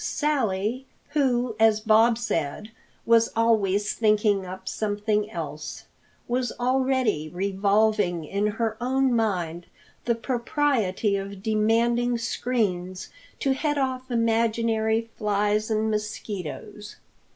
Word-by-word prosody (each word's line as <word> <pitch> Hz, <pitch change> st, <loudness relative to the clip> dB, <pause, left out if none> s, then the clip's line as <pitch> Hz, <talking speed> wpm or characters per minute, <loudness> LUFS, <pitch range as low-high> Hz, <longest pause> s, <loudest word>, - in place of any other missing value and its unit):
Sally, 255 Hz, -4 st, -1 dB, 0.2 s
who, 250 Hz, -5 st, +1 dB
as 220 Hz, -1 st, +5 dB
Bob 220 Hz, +1 st, +4 dB
said, 210 Hz, -2 st, -3 dB, 0.3 s
was 230 Hz, 0 st, +4 dB
"always 210 Hz, -3 st, +2 dB
thinking 210 Hz, -3 st, +2 dB
up 190 Hz, +1 st, -9 dB
something 210 Hz, 0 st, -1 dB
else," 155 Hz, -6 st, -6 dB, 0.4 s
was 245 Hz, 0 st, -1 dB
already 255 Hz, -, +1 dB
revolving 200 Hz, -1 st, +1 dB
in 200 Hz, +6 st, -1 dB
her 220 Hz, +1 st, -2 dB
own 265 Hz, +1 st, +2 dB
mind 175 Hz, -7 st, -1 dB, 0.4 s
the 235 Hz, -, +2 dB
propriety 235 Hz, -5 st, 0 dB
of 195 Hz, 0 st, -7 dB
demanding 230 Hz, +3 st, +2 dB
screens 210 Hz, -6 st, -2 dB, 0.3 s
to 270 Hz, -, +2 dB
head 295 Hz, +2 st, -1 dB
off 260 Hz, -1 st, -2 dB
imaginary 230 Hz, -1 st, +1 dB
flies 210 Hz, +1 st, +1 dB
and 220 Hz, 0 st, +1 dB
mosquitoes. 210 Hz, -1 st, -5 dB
220 Hz, 105 wpm, -25 LUFS, 200-235 Hz, 0.4 s, as